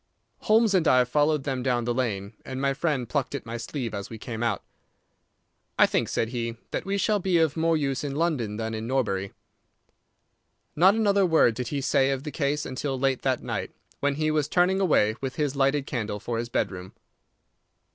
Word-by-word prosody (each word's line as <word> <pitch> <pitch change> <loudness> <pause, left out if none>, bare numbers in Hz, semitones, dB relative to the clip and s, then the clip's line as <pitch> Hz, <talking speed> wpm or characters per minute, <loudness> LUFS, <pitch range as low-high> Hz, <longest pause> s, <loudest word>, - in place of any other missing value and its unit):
Holmes 220 -1 +3
and 175 -4 +3
I 125 0 +6
followed 150 +3 +1
them 135 -2 -2
down 125 -2 0
the 120 - 0
lane, 105 -5 -2
and 130 0 -6
my 140 0 +1
friend 135 -4 -1
plucked 140 +2 -2
at 140 - -6
my 115 0 -5
sleeve 120 0 -4
as 100 -1 -5
we 115 - -7
came 110 0 -6
out. 115 -4 0 1.1
"I - - +7
think," - - 0
said 115 - -1
he, 115 -1 -3
"that - - -3
we 200 +1 -1
shall 205 +1 +2
be 185 -2 +1
of 160 -3 +2
more 165 0 +2
use 135 -3 -1
in 140 -1 -3
London 140 -10 -1
than 110 0 -3
in 110 +1 -4
Norbury." 100 -7 -1 1.4
Not 185 +6 +5
another 200 -3 +3
word 160 -9 +4
did 125 +1 -4
he 140 +2 -2
say 135 0 +2
of 135 -1 -2
the 150 - -5
case 145 0 -1
until 135 +1 -3
late 135 -1 +1
that 130 -2 0
night, - - -4 0.2
when 145 0 0
he 155 +1 0
was 150 -2 +1
turning 180 +4 +2
away, 110 - +3
with 135 -1 -4
his 145 -2 -1
lighted 135 +1 +2
candle, 110 -6 -3
for 115 +2 -3
his 120 0 -4
bedroom. 95 -4 -3
135 Hz, 200 wpm, -26 LUFS, 120-155 Hz, 1.4 s, I